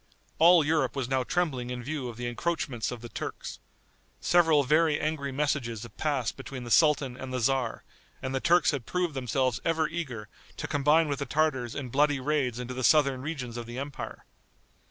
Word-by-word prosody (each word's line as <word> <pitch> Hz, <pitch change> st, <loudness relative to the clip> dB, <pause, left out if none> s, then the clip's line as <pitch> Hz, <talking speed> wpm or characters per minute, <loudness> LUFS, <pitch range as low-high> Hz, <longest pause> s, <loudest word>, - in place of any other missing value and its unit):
All 170 Hz, -1 st, +7 dB
Europe 150 Hz, -4 st, +1 dB
was 135 Hz, -3 st, -2 dB
now 130 Hz, 0 st, +1 dB
trembling 135 Hz, -7 st, -1 dB
in 125 Hz, -1 st, -5 dB
view 135 Hz, -1 st, -4 dB
of 115 Hz, -, -9 dB
the 120 Hz, -, -4 dB
encroachments 120 Hz, -1 st, -2 dB
of 120 Hz, -2 st, -6 dB
the 120 Hz, -, -8 dB
Turks. -, -, -6 dB, 0.6 s
Several 160 Hz, -4 st, +4 dB
very 155 Hz, +2 st, +3 dB
angry 150 Hz, -2 st, -2 dB
messages 130 Hz, -5 st, -1 dB
had 115 Hz, -3 st, -11 dB
passed 140 Hz, -7 st, -1 dB
between 135 Hz, -1 st, -7 dB
the 120 Hz, -, -7 dB
sultan 145 Hz, -4 st, +4 dB
and 130 Hz, 0 st, -7 dB
the 130 Hz, -, -1 dB
tzar, 125 Hz, -1 st, 0 dB, 0.4 s
and 130 Hz, 0 st, -4 dB
the 135 Hz, -, 0 dB
Turks 175 Hz, +5 st, +4 dB
had 135 Hz, -6 st, -4 dB
proved 180 Hz, -3 st, -1 dB
themselves 130 Hz, -1 st, 0 dB
ever 160 Hz, -1 st, +1 dB
eager 140 Hz, -10 st, -5 dB, 0.3 s
to -, -, -4 dB
combine 150 Hz, +3 st, +3 dB
with 140 Hz, -2 st, -2 dB
the 140 Hz, -, -3 dB
Tartars 130 Hz, -5 st, 0 dB
in 140 Hz, -3 st, -4 dB
bloody 145 Hz, +2 st, +2 dB
raids 130 Hz, -3 st, 0 dB
into 125 Hz, 0 st, -5 dB
the 130 Hz, 0 st, -4 dB
southern 140 Hz, -3 st, +4 dB
regions 130 Hz, -5 st, -5 dB
of 120 Hz, -1 st, -6 dB
the 120 Hz, +1 st, -7 dB
empire. 140 Hz, +1 st, -6 dB
135 Hz, 195 wpm, -28 LUFS, 125-155 Hz, 0.6 s, All